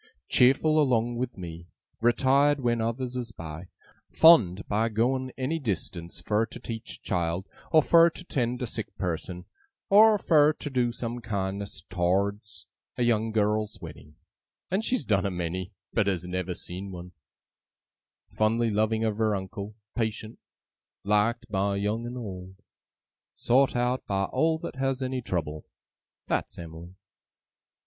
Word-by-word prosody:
Cheerful 155 Hz, +5 st, +4 dB
along 120 Hz, -3 st, +1 dB
with 125 Hz, -2 st, -3 dB
me; 85 Hz, -2 st, -8 dB, 0.3 s
retired 135 Hz, +5 st, +3 dB
when 120 Hz, -3 st, +1 dB
others 120 Hz, +2 st, -2 dB
is 120 Hz, -3 st, -4 dB
by; 80 Hz, -2 st, -8 dB, 0.4 s
fond 105 Hz, -, +6 dB
of 110 Hz, +2 st, 0 dB
going 130 Hz, +3 st, +1 dB
any 140 Hz, +5 st, -1 dB
distance 90 Hz, -, -4 dB
fur 110 Hz, +1 st, 0 dB
to -, -, -10 dB
teach 115 Hz, -1 st, -6 dB
a -, -, -38 dB
child, 90 Hz, 0 st, -2 dB, 0.2 s
or 155 Hz, -2 st, +6 dB
fur 170 Hz, +2 st, +6 dB
to 175 Hz, -, -11 dB
tend 125 Hz, -6 st, -2 dB
a -, -, 0 dB
sick 110 Hz, -1 st, -6 dB
person, 90 Hz, 0 st, -4 dB, 0.5 s
or 215 Hz, +1 st, +7 dB
fur 155 Hz, -5 st, +4 dB
to 150 Hz, -, -6 dB
do 125 Hz, -2 st, +1 dB
some 120 Hz, 0 st, -4 dB
kindness 100 Hz, -2 st, -4 dB
tow'rds 100 Hz, +4 st, -1 dB, 0.3 s
a 125 Hz, -, +1 dB
young 115 Hz, -2 st, +1 dB
girl's 105 Hz, 0 st, 0 dB
wedding 75 Hz, 0 st, -11 dB, 0.6 s
(and 195 Hz, +4 st, +1 dB
she's 250 Hz, +2 st, 0 dB
done 100 Hz, -3 st, +2 dB
a 100 Hz, -, 0 dB
many, 90 Hz, +1 st, -4 dB, 0.2 s
but 110 Hz, -3 st, +2 dB
has 90 Hz, -3 st, -1 dB
never 90 Hz, 0 st, -3 dB
seen 95 Hz, +4 st, -6 dB
one); 90 Hz, 0 st, -9 dB, 1.2 s
fondly 115 Hz, +1 st, +2 dB
loving 110 Hz, +1 st, +1 dB
of 110 Hz, -1 st, -1 dB
her 110 Hz, -2 st, +2 dB
uncle; 100 Hz, +2 st, -6 dB, 0.2 s
patient; 110 Hz, -1 st, -3 dB, 0.6 s
liked 110 Hz, +4 st, +1 dB
by 100 Hz, -1 st, 0 dB
young 105 Hz, +4 st, -1 dB
and 125 Hz, +1 st, -6 dB
old; 95 Hz, -5 st, -7 dB, 0.8 s
sowt 130 Hz, +2 st, +3 dB
out 125 Hz, +1 st, 0 dB
by 95 Hz, -1 st, 0 dB
all 160 Hz, +10 st, +1 dB
that 160 Hz, -5 st, -7 dB
has 135 Hz, 0 st, -1 dB
any 130 Hz, 0 st, -2 dB
trouble. 80 Hz, -8 st, -4 dB, 0.6 s
That's -, -, -2 dB
Em'ly! 85 Hz, +1 st, -9 dB
110 Hz, 145 wpm, -27 LUFS, 95-125 Hz, 1.2 s, or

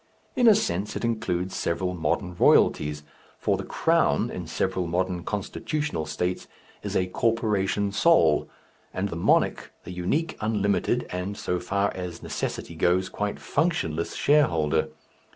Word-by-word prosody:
In 245 Hz, -, +4 dB
a 220 Hz, -, +8 dB
sense 100 Hz, -, -1 dB
it -, -, -2 dB
includes 95 Hz, -5 st, -1 dB
several 90 Hz, +2 st, -1 dB
modern 90 Hz, +2 st, -1 dB
royalties, 75 Hz, -3 st, +3 dB, 0.3 s
for -, -, +1 dB
the -, -, -4 dB
crown -, -, +1 dB
in 90 Hz, -2 st, -6 dB
several 90 Hz, +3 st, -1 dB
modern 90 Hz, 0 st, -1 dB
constitutional 105 Hz, -, -3 dB
states 90 Hz, +5 st, -2 dB, 0.3 s
is -, -, -5 dB
a 90 Hz, -, +2 dB
corporation 105 Hz, -1 st, 0 dB
sole, 100 Hz, -, +4 dB, 0.5 s
and 100 Hz, +2 st, -1 dB
the 85 Hz, -, -5 dB
monarch 85 Hz, -, +1 dB
the 90 Hz, -, -8 dB
unique, 95 Hz, -, -1 dB
unlimited, 105 Hz, -2 st, +1 dB
and 90 Hz, +3 st, -4 dB
so 90 Hz, -, -2 dB
far 100 Hz, +2 st, 0 dB
as 90 Hz, -2 st, -6 dB
necessity -, -, -4 dB
goes, 90 Hz, +3 st, +1 dB
quite 105 Hz, +1 st, -3 dB
functionless 110 Hz, -, -1 dB
shareholder. 80 Hz, -, +2 dB
95 Hz, 135 wpm, -26 LUFS, 85-105 Hz, 0.5 s, a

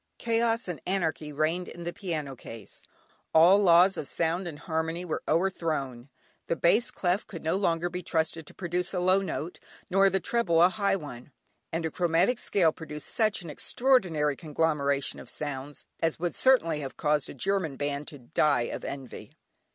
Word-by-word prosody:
Chaos 230 Hz, 0 st, 0 dB
and 175 Hz, -6 st, -5 dB
anarchy 160 Hz, -5 st, -1 dB
reigned 155 Hz, +5 st, -1 dB
in 170 Hz, -, -9 dB
the 175 Hz, 0 st, -4 dB
piano 155 Hz, -8 st, -4 dB
case, 115 Hz, -3 st, -10 dB, 0.5 s
all 175 Hz, +5 st, +7 dB
laws 180 Hz, 0 st, +5 dB
of 140 Hz, -, -4 dB
sound 170 Hz, +2 st, -1 dB
and 155 Hz, -4 st, -6 dB
harmony 165 Hz, +1 st, -3 dB
were 160 Hz, -, -3 dB
o'erthrown, 155 Hz, -8 st, -1 dB, 0.4 s
the -, -, 0 dB
bass 175 Hz, +9 st, +3 dB
clef 180 Hz, +2 st, -1 dB
could 165 Hz, -, -8 dB
no 160 Hz, -, +1 dB
longer 175 Hz, -3 st, +1 dB
be 180 Hz, +1 st, -5 dB
trusted 160 Hz, -2 st, -1 dB
to -, -, -12 dB
produce 180 Hz, +1 st, -2 dB
a -, -, +1 dB
low 185 Hz, +2 st, +3 dB
note, 180 Hz, -3 st, -4 dB, 0.3 s
nor 195 Hz, +1 st, +5 dB
the 195 Hz, +1 st, +1 dB
treble 185 Hz, -4 st, +1 dB
a 175 Hz, +2 st, +7 dB
high 200 Hz, -1 st, +1 dB
one, 145 Hz, -7 st, -8 dB, 0.4 s
and 165 Hz, 0 st, -2 dB
a 160 Hz, -, -2 dB
chromatic 175 Hz, +8 st, +2 dB
scale 175 Hz, -6 st, +2 dB
produced 150 Hz, -2 st, -6 dB
such 215 Hz, -4 st, +1 dB
an 165 Hz, -, -7 dB
extraordinary 170 Hz, -, +1 dB
conglomeration 145 Hz, -3 st, -1 dB
of -, -, -8 dB
sounds, 145 Hz, -1 st, -5 dB
as 165 Hz, -1 st, 0 dB
would 175 Hz, +1 st, -2 dB
certainly 165 Hz, -, +3 dB
have 135 Hz, -2 st, -6 dB
caused 150 Hz, -2 st, +1 dB
a -, -, -8 dB
German 185 Hz, -1 st, 0 dB
band 145 Hz, +1 st, -3 dB
to 145 Hz, -, -6 dB
die 140 Hz, +1 st, +1 dB
of 120 Hz, -, -4 dB
envy. 135 Hz, -3 st, -7 dB
165 Hz, 175 wpm, -28 LUFS, 150-185 Hz, 0.5 s, all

